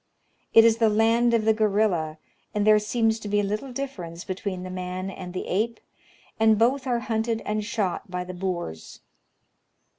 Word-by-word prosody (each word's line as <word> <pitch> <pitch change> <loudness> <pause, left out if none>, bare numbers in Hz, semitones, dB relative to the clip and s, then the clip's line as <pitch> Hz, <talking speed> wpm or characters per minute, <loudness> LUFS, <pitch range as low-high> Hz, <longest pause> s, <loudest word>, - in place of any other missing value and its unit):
It 225 - +8
is 230 -1 +5
the 225 -1 +4
land 225 +3 +3
of 220 -2 +1
the 220 - +5
gorilla, 200 -7 +1 0.4
and 205 -1 +1
there 215 0 +6
seems 220 +1 0
to 210 - -7
be 205 0 +1
little 210 +7 -3
difference 190 -11 -6
between 185 -1 -4
the 185 - -6
man 185 +1 -4
and 180 -1 -8
the 185 - -4
ape, 225 +5 -1 0.6
and 220 -1 +5
both 260 +4 +2
are 240 -2 0
hunted 225 0 -1
and 215 0 -1
shot 205 -4 -2
by 180 0 -3
the 180 0 -7
Boers. 175 - -5
210 Hz, 175 wpm, -25 LUFS, 185-225 Hz, 0.6 s, It